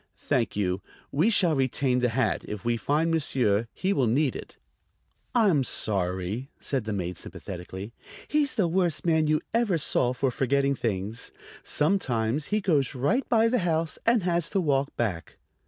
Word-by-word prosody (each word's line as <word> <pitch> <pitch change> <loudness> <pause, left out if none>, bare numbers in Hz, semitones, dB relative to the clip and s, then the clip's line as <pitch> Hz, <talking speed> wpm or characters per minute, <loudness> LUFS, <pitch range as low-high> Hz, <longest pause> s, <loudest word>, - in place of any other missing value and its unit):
"Thank 120 -4 -1
you; 95 -2 0 0.3
we 160 +10 +3
shall 185 -7 +4
retain 130 -2 +1
the 125 0 +2
hat. 120 0 0
If 105 +1 -6
we 120 0 +2
find 150 +7 +1
monsieur 120 -9 +1
he 195 +2 -1
will 135 -7 +2
need 135 +4 +1
it." - - -9 0.8
"I'm 195 - +4
sorry," 95 +3 -2
said 135 -6 -2
the 110 - -3
maid 90 -3 -3
sympathetically. 95 +4 -8 0.3
"He's 295 -2 +1
the 205 -7 +2
worst 170 -4 0
man 160 -2 +3
you 155 0 +2
ever 225 -6 +2
saw 130 -5 +1
for 130 0 0
forgetting 140 +2 +1
things. 110 -2 -3 0.3
Sometimes 140 - 0
he 210 0 0
goes 150 -10 +1
right 200 - 0
by 225 -1 +4
the 250 +1 +2
house 165 -3 -1
and 230 -3 +3
has 170 -2 0
to 195 - 0
walk 140 -5 +1
back." 100 -8 -3
140 Hz, 165 wpm, -27 LUFS, 115-170 Hz, 0.8 s, shall